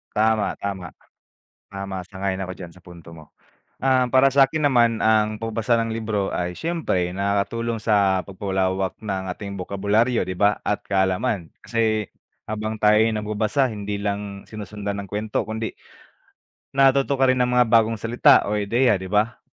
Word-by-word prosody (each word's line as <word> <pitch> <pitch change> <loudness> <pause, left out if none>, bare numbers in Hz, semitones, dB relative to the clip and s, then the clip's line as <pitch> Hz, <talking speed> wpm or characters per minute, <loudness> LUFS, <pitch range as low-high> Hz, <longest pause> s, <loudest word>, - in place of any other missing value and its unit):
Tama 110 0 +1
tama. 95 -4 -5 0.8
Tama, 95 -1 -5
sang-ayon 95 -1 -3
ako 95 -1 -4
diyan 85 -3 -9
sa 90 - -18
punto 85 -1 -13
mo. 80 -2 -14 0.5
Ah, 130 -1 +3
para 130 +2 +4
sakin 140 +2 +3
naman 120 -3 +3
ang 110 -1 +3
pagbabasa 115 +1 0
ng 115 - -3
libro 110 -3 -2
ay 90 0 -3
siyempre 155 - -1
nakakatulong 100 +4 -1
sa 100 -4 +2
pagpalawak 95 -1 -2
ng 95 -3 -3
ating 100 -2 -7
bokabularyo, 100 +6 +1
di 90 0 -5
ba, 105 0 +2
at 105 - 0
kaalaman 95 -1 0
kasi 110 -3 0 0.4
habang 110 0 -4
tayo'y 105 +1 +4
nagbabasa 110 +5 0
hindi 105 -3 -4
lang 100 -1 -4
sinusundan 105 -1 -5
ng 100 - -12
kuwento 105 +1 -2
kundi 110 0 -5 1.0
natuto 135 0 +3
ka 135 - +4
rin 130 - +3
ng 125 - -1
mga 125 -2 +4
bagong 115 -2 +3
salita 115 +2 +5
o 105 - 0
ideya, 110 +2 +2
di 95 +1 -7
ba? 105 +3 +1
105 Hz, 155 wpm, -23 LUFS, 95-115 Hz, 1.0 s, salita